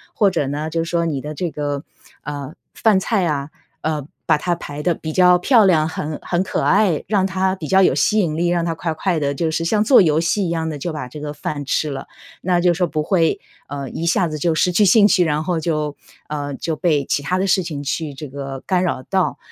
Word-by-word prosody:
或 205 -2 +4
者 140 - -1
呢， 150 +3 -3
就 165 +1 -1
说 170 0 0
你 145 -4 -1
的 150 +3 -6
这 175 +1 -3
个， 145 -1 -3 0.4
呃， 145 0 -6 0.2
饭 210 -4 +3
菜 195 -2 0
啊， 145 -3 -2 0.3
呃， 150 -3 -2 0.2
把 150 - +3
它 175 +3 -1
排 145 -2 -7
得 175 +2 +1
比 155 - -6
较 180 +1 +5
漂 225 +3 +4
亮、 160 -4 +3
很 155 -1 -4
很 175 0 -1
可 185 - -2
爱， 195 -5 +2
让 200 -2 +2
它 190 0 0
比 160 -5 -7
较 190 0 +4
有 - - +4
吸 215 0 +2
引 160 -5 0
力， 175 +1 +1
让 175 -1 +1
他 165 -1 -1
快 165 0 -3
快 170 0 -1
地 140 -1 0
就 160 +2 -1
是 165 +1 -1
像 210 +4 +2
做 255 +1 +6
游 160 -3 +3
戏 190 +4 0
一 - - -2
样 160 -1 -1
地 150 - -4
就 160 +3 -4
把 145 -5 -5
这 150 - -9
个 150 0 -5
饭 145 -1 -5
吃 150 +3 0
了。 135 -1 -6 0.3
那 175 -1 +1
就 175 -1 +4
是 - - -6
说 180 -1 +1
不 155 - -2
会， 165 -1 +1 0.3
呃， 140 -1 -5
一 165 - -4
下 175 +1 +2
子 155 - -4
就 160 +2 0
失 180 - +2
去 205 +4 +4
兴 205 +2 +6
趣， 195 -4 +4
然 150 0 0
后 175 -2 -1
就 155 -2 -2 0.3
呃， 145 -1 -3
就 160 +3 -3
被 150 -4 +1
其 145 - 0
它 180 +6 -1
的 190 - 0
事 185 +1 +3
情 150 -4 -5
去 150 +1 -3
这 150 +2 -8
个 135 -1 -6
干 185 -2 +1
扰 170 -7 -2
到。 190 +5 0
165 Hz, 265 characters per minute, -20 LUFS, 150-180 Hz, 0.4 s, 做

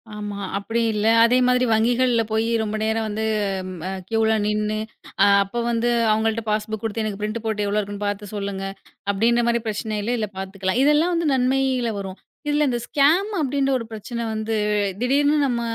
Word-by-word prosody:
ஆமா. 205 -1 -5 0.2
அப்படி 225 +4 -2
இல்ல. 210 0 -1 0.2
அதே 240 +2 +4
மாதிரி 250 0 +3
வங்கிகள்ல 240 +2 +2
போய் 220 +1 +1 0.2
ரொம்ப 215 0 -3
நேரம் 220 0 0
வந்து 215 +1 -2 0.6
அ - - -2 0.2
க்யூல 220 0 +2
நின்னு, 210 0 0 0.5
அ - - +7 0.2
அப்போ 200 +5 -5
வந்து 235 +1 +1 0.2
அவங்கள்ட்ட 220 +1 +1
பாஸ்புக் 215 0 -2
குடுத்து 225 0 -2
எனக்கு 210 -2 -4
பிரிண்ட் 215 +2 -2
போட்டு 210 -2 -1
எவ்வளோ 205 +1 0
இருக்குன்னு 205 0 -4
பாத்து 205 0 -4
சொல்லுங்க 200 -1 -4 0.5
அப்படின்ற 230 +4 +2
மாரி 235 0 +1
பிரச்சனை 215 0 -3
இல்ல. 230 +4 -1
இதுல 215 -3 -2
பாத்துக்கலாம். 190 +2 -2
இதெல்லாம் 300 +5 +3
வந்து 335 -1 0
நன்மையில 260 -2 +1
வரும். 190 -1 -6 0.3
இதுல 295 0 +2
இந்த 240 -1 -1
ஸ்கேம் 325 +8 +3
அப்படின்ற 275 -1 0
ஒரு 230 - -6
பிரச்சனை 230 +2 -5
வந்து 220 +1 -2 0.4
திடீர்னு 285 +4 +2
நம்ம 240 -2 -1
225 Hz, 170 wpm, -22 LUFS, 210-250 Hz, 0.6 s, அ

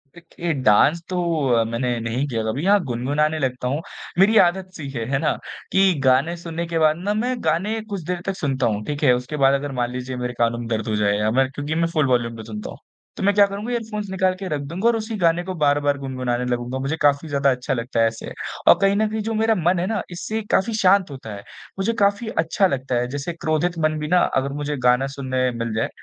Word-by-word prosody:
देखिए 170 0 -5
डांस 140 +10 +4
तो 185 - -2 0.4
अ, 115 -1 +4
मैंने 115 +1 -2
नहीं 115 +5 -2
किया 115 -5 -2
कभी। 120 +9 -2
हाँ, 205 +1 +5
गुनगुनाने 145 +6 0
लगता 125 -2 -2
हूँ 145 +5 -1 0.4
मेरी 215 +3 +5
आदत-सी 185 -4 +1
है। 115 -4 -4
है 135 - +2
ना? 155 - +1 0.4
की 190 -1 +4
गाने 135 +5 +3
सुनने 170 0 -5
के 165 -1 -1
बाद 155 0 +3
ना 195 +4 -1
मैं 245 +4 0
गाने 190 +8 0
कुछ 200 -3 -4
देर 175 +2 -3
तक 195 - -2
सुनता 135 -3 -1
हूँ 105 -1 -1
ठीक 145 0 -4
है 130 -3 +6
उसके 125 +5 -3
बाद 135 0 +4
अगर 140 0 -1
मान 120 0 -1
लीजिए 125 +1 -5
मेरे 125 0 -3
कानों 120 0 +1
दर्द 110 -1 -2
हो 110 - 0
जाए 105 -1 +2
या 105 +1 +1
मैं 130 +2 +2
क्योंकि 145 +3 -4
मैं 165 0 +2
फ़ुल 155 -3 +2
वॉल्यूम 120 -2 +1
पे 110 - -8
सुनता 105 -1 -7
हूँ, - - -9 0.4
तो - - -4
मैं 200 +1 +4
क्या 205 - +7
करूँगा 205 +5 -5
हेडफ़ोन्स 215 -4 -3
निकाल 185 -1 +1
के 195 - -5
रख 145 -2 -2
दूँगा, 170 +10 -2
और 235 - +4
उसी 220 +1 -4
गाने 170 -1 +2
को 185 +1 -4
बार-बार 145 -2 +2
गुनगुनाने 130 -2 -2
लगूँगा 125 +1 -2
मुझे 140 +4 -2
काफ़ी 145 +1 +3
ज़्यादा 140 -1 +2
अच्छा 130 +2 -2
लगता 115 -1 -2
है 115 - +5
ऐसे। 115 0 -6 0.4
और - - +8
कहीं 195 0 +4
न 215 +1 +2
कहीं 220 0 -2
जो 225 +1 -3
मेरा 225 +1 +2
मन 175 0 +1
है 175 - 0
ना 220 -1 -1
इससे 215 +5 -3
काफ़ी 225 +3 +2
शांत 190 -2 +4
होता 120 -6 -8
है 100 - -10 0.4
मुझे 195 +4 +1
काफ़ी 200 +3 +2 0.2
अच्छा 190 +4 +2
लगता 130 -5 -2
है 120 0 0
जैसे 145 +5 -4
क्रोधित 160 +2 -1
मन 155 0 +1
भी 150 - -3
ना 180 +2 +4
अगर 135 +1 0
मुझे 145 0 -2
गाना 125 +2 +3
सुनने 130 -2 0
मिल 115 -2 -3
जाए 110 - 0
145 Hz, 240 wpm, -22 LUFS, 125-185 Hz, 0.4 s, और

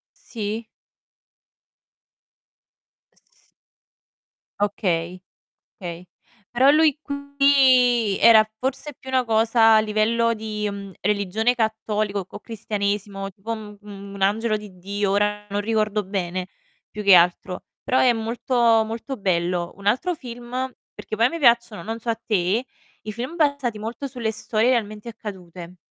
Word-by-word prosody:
Sì. 220 0 -5 2.5
S - - -38 1.4
Okay, 180 -3 -1 0.6
okay. 175 -1 -7 0.5
Però 260 +3 +5
lui 310 -1 +4
qui 270 -6 +3
era 220 -2 +7
forse 270 +2 -2
più 265 - -11
una 260 -1 +2
cosa 225 0 +4
a - - +6
livello 220 +2 +1
di, 215 -1 -4
mhmm, 200 -1 -7
religione 210 +4 +1
cattolico, 215 -3 -1
c - - -34
o - - -7
cristianesimo, 200 -3 -3
tipo 205 +5 -8
un 210 -2 -6
un 200 -1 -10
angelo 215 +3 +1
di 205 -3 -12
Dio 200 +2 -2
ora 210 +1 0
non 205 +1 -1
ricordo 215 -1 0
bene, 185 -2 -3 0.4
più 210 - -7
che 200 -1 +7
altro, 180 +1 +2 0.2
però 260 -1 +2
è 250 - +5
molto, 230 0 +2
molto 230 +4 -5
bello. 175 -2 -1
Un 200 - -13
altro 260 - +1
film 240 -3 -10 0.4
perché 215 - -6
poi 225 - +3
a - - +4
me 335 +4 -5
piacciono, 235 -4 +3
non 225 +1 -5
so 230 - -5
a 225 - +1
te, 215 +1 0 0.4
i 215 - -5
film 245 +9 -5
basati 285 -8 0
molto 230 +6 -5
sulle 240 -4 -3
storie 220 +2 0
realmente 215 -1 -2
accadute. 180 -5 -9
215 Hz, 135 wpm, -23 LUFS, 200-235 Hz, 2.5 s, era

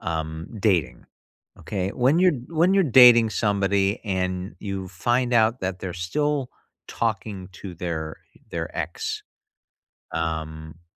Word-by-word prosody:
um, 80 0 -4
dating. 85 - +1 0.5
Okay? 95 -2 -3
When 130 +9 +2
you're 180 0 +5 0.2
when 170 +3 +3
you're 195 - +5
dating 120 -4 +7
somebody 100 -1 +1
and 95 -1 -2
you 95 -2 -5
find 120 +7 0
out 115 +1 +3
that 95 -1 -3
they're 95 -2 -4
still 135 - -1 0.4
talking 100 -4 -3
to 90 +1 -9
their 80 -2 -4 0.3
their - - -4
ex, - - -3 0.9
um, 80 -1 -4
h - - -28
95 Hz, 125 wpm, -24 LUFS, 85-120 Hz, 0.9 s, dating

